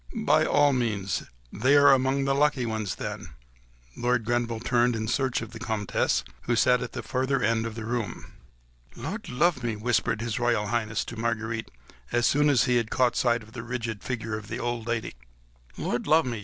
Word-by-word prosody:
"By 155 -6 +4
all 145 -1 +4
means!—They 105 - -1
are 145 -1 +7
among 135 +1 +1
the 135 - +2
lucky 140 -2 +2
ones 110 -6 -2
then!" - - -6 0.6
Lord 120 -2 0
Grenville 120 -1 0
turned 120 +1 +2
in 110 0 -3
search 130 0 0
of 110 - -9
the 115 - -9
Comtesse, 110 -3 0 0.2
who 120 - +2
sat 125 +2 +4
at 125 - -5
the - - -5
further 130 +1 0
end 115 +1 +1
of 110 - -7
the 110 -1 -6
room. 115 -2 -4 0.6
"Lud 160 - -6
love 140 +3 +2
me!" 115 -2 -2
whispered 110 -1 0
His 115 -2 -2
Royal 120 -3 +1
Highness 110 -2 -1
to 115 - -8
Marguerite, 115 -1 -2 0.4
as 120 0 +2
soon 145 +1 +4
as 135 -5 +4
he 125 -2 +2
had 115 -2 -1
caught 125 -2 +2
sight 120 -2 +1
of 110 - -16
the 115 - -5
rigid 115 -3 -4
figure 115 -3 -3
of 105 -1 -7
the - - -4
old 120 -1 -3
lady; 120 -1 -2 0.6
"Lud 120 - -2
love 160 +1 +5
me! 120 -3 -3
120 Hz, 195 wpm, -27 LUFS, 110-125 Hz, 0.6 s, are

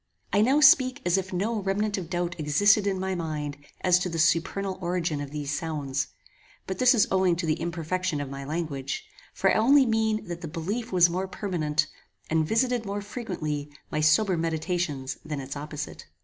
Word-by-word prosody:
I 205 - +4
now 265 +7 +4
speak 260 -2 +6
as 175 - +3
if 190 +1 -6
no 210 +4 -1
remnant 205 +2 0
of 180 -5 -5
doubt 175 -1 -2
existed 200 +8 +4
in 190 -2 0
my 190 0 -1
mind 155 -4 -3 0.2
as 180 -1 +4
to 180 - -2
the 165 - -4
supernal 185 +4 +1
origin 170 -4 -1
of 145 - -5
these 145 -1 -4
sounds; 140 -4 -2 0.6
but 190 -1 -5
this 255 +1 +6
is 215 - +5
owing 190 -2 +3
to 170 0 -3
the 155 0 0
imperfection 170 0 -2
of 145 - -3
my 140 +1 -7
language, 140 -3 -4 0.3
for 195 - +2
I - - +3
only 270 +4 +6
mean 220 -2 +1
that 175 0 -6
the 170 - -5
belief 195 +9 -4
was 180 -2 +6
more 185 +3 -2
permanent, 160 -6 -1 0.5
and 160 -1 +2
visited 240 +2 +1
more 205 0 -3
frequently 155 - -4 0.2
my 155 - 0
sober 175 +6 +4
meditations 160 -4 -2
than 150 -2 -4
its 135 +1 -6
opposite. 150 +1 -6
175 Hz, 190 wpm, -27 LUFS, 155-200 Hz, 0.6 s, speak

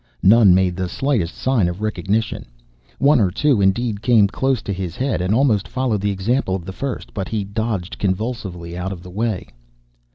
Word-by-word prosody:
None 100 -2 +7
made 95 -1 +2
the 90 0 -3
slightest 115 -8 -1
sign 125 -8 +1
of 90 +2 -4
recognition. 105 - -2 0.5
One 140 -1 +4
or 100 -4 +3
two, 130 +4 +2
indeed, 100 +2 +1
came 115 -4 +5
close 130 +2 -1
to 100 - -3
his 90 -2 -5
head 130 -7 -1
and 90 +2 -1
almost 110 -4 +2
followed 125 -5 -1
the 100 - 0
example 100 +2 0
of 90 -3 -6
the 95 - -6
first, 135 +5 -5
but 95 -3 -3
he 110 -2 -2
dodged 100 -2 -3
convulsively 95 -4 -3
out 90 +2 -3
of 90 -3 -7
the 90 - -10
way. 105 -1 -2
100 Hz, 190 wpm, -20 LUFS, 95-120 Hz, 0.5 s, None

